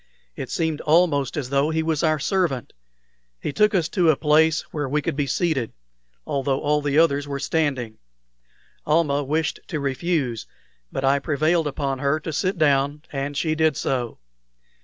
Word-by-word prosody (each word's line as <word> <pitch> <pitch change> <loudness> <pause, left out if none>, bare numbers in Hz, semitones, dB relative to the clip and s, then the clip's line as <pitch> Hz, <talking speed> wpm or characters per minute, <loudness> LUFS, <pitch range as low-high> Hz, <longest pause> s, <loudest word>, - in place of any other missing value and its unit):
It - - -6
seemed 160 -6 -1
almost 155 -4 +2
as 135 -3 -4
though 140 +2 +2
he 160 0 0
was 160 -2 0
our 155 -2 +2
servant. 155 - -1 0.7
He 145 - -4
took 210 0 +3
us 170 -4 +2
to 180 -5 +2
a 155 - +5
place 155 +2 +3
where 145 -3 -2
we 150 +3 +1
could 145 - -2
be 145 -1 -1
seated, 140 -4 0 0.5
although 135 -1 -1
all 150 0 +1
the 145 0 0
others 145 -3 +3
were 140 -1 -3
standing. 135 -6 -1 0.8
Almah 150 -2 +2
wished 150 +3 -1
to 155 - -3
refuse, 135 -3 -1 0.4
but 135 - -3
I 140 +1 +3
prevailed 155 +3 +1
upon 135 -2 -2
her 140 +3 +1
to 160 - -5
sit 185 +5 -1
down, 145 -1 +2
and 140 0 -3
she 155 0 +1
did 155 -2 +2
so. 125 -4 -2
150 Hz, 170 wpm, -23 LUFS, 140-160 Hz, 0.8 s, a